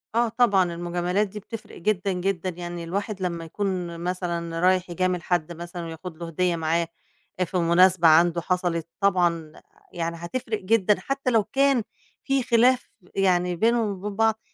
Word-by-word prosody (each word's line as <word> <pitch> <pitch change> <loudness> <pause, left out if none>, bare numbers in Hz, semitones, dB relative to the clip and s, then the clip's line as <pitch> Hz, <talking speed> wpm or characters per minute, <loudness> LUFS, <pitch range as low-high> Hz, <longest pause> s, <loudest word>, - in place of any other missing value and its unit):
آه 235 0 +3
طبعًا 220 -5 +3
المجاملات 175 +4 -1
دي 210 +2 -8
بتفرِق 215 +2 -9
جدًا، 195 +1 0
جدًا، 185 0 -1
يعني 175 0 -6
الواحد 200 +3 -4
لمّا 170 -2 -3
يكون 175 -1 -3
مثلًا 170 -2 -3
رايح 185 0 +2
يجامل 180 +1 0
حد 175 -2 0
مثلًا 170 +1 -7
وياخد 165 +1 -8
له 170 0 -6
هدية 175 +1 0
معاه 165 +1 0 0.5
أ 185 - +3
في 180 +2 -3
مناسبة 175 0 +5
عنده 170 +2 +5
حصَلِت 175 -2 -1
طبعًا 175 -5 +1 0.3
يعني 170 -1 -3
هتفرِق 215 +5 -3
جدًا 210 0 +2
حتى 275 -2 -2
لو 225 -3 +4
كان 270 +2 +2 0.4
في 270 -2 +1
خِلاف 250 +1 +3 0.3
يعني 180 -2 +2
بينهم 225 +3 +2
وبين 200 +1 -5
بعض، 220 +1 +2
180 Hz, 155 wpm, -25 LUFS, 170-210 Hz, 0.5 s, مناسبة